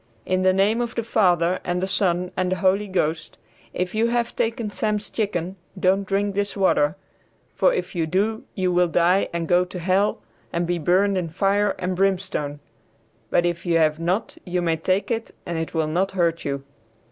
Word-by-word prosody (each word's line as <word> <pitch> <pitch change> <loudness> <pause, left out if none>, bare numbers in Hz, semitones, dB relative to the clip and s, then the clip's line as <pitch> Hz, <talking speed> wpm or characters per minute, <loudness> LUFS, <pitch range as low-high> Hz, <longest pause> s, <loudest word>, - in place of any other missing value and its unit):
"In 185 0 +1
the 185 0 +4
name 200 +5 +2
of 240 0 -3
the 235 - -1
Father 180 -5 +2
and 175 0 -1
the 185 - 0
Son 180 -2 0
and 185 0 0
the - - +2
Holy 190 +3 +2
Ghost, 160 -4 -2 0.3
if 180 0 -3
you 220 +2 +2
have 235 0 -1
taken 225 -1 -1
Sam's 210 -1 -2
chicken 190 -4 -2 0.2
don't 190 +1 +2
drink 200 +1 0
this 200 +1 -2
water, 170 -5 +3 0.6
for - - +3
if - - -3
you 165 -3 -1
do 205 +6 0
you 185 -2 +1
will 180 0 +3
die 175 +3 +2
and 170 -1 -3
go 175 +2 +4
to 180 +1 -8
hell 190 +4 +1 0.3
and 170 +1 -1
be 175 0 -1
burned 190 +4 +2
in 170 -2 -3
fire 200 +4 +1
and 185 0 -2
brimstone, 185 -6 -1 0.7
but 175 - +2
if 170 -1 -1
you 170 -2 +2
have 155 -1 +2
not 180 +6 -1
you 180 -1 -2
may 165 -2 +1
take 185 +6 0
it 230 -1 -3
and 170 -1 -3
it 160 +1 -4
will 160 -1 +2
not 180 +5 0
hurt 170 -3 0
you." 140 -1 -2
185 Hz, 195 wpm, -23 LUFS, 170-200 Hz, 0.7 s, the